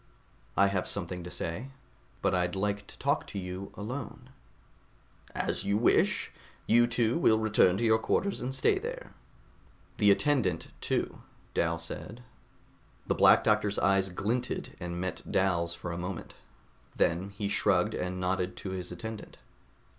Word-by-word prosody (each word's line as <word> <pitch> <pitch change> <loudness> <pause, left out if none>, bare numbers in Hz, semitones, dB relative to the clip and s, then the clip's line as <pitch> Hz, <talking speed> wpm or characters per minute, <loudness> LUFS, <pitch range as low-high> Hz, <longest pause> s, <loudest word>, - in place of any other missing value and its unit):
"I 100 - +6
have 95 -2 -1
something 90 -1 -4
to 90 - -7
say, 90 +6 -4 0.6
but - - +2
I'd 90 0 +1
like 100 +1 -1
to - - -13
talk - - 0
to - - -7
you 95 +1 -5
alone." 120 +5 -6 1.0
"As - - -1
you 100 +1 +1
wish. 115 - +2 0.3
You 120 +1 +5
two 120 +3 +1
will 110 -9 +5
return 105 -4 +4
to 120 - -1
your 110 -1 +4
quarters 200 - 0
and 130 +2 -2
stay 135 - +3
there." - - -6 0.8
"The 105 -2 +5
attendant, 100 - +2
too," - - -1 0.3
Dal 85 0 +1
said. 105 +8 -7 0.8
The - - +1
Black - - +6
Doctor's 105 -1 +2
eyes 95 0 +3
glinted 115 +7 -2
and 85 0 -4
met 90 -1 -4
Dal's 85 -3 +1
for 90 - -6
a 85 - -4
moment. 90 0 -5 0.6
Then 90 +4 +1
he 100 - -1
shrugged 100 +1 +2
and 90 0 -3
nodded 90 0 -1
to 95 - -5
his 90 -1 -4
attendant. 110 -2 -7
100 Hz, 150 wpm, -30 LUFS, 90-110 Hz, 1.0 s, I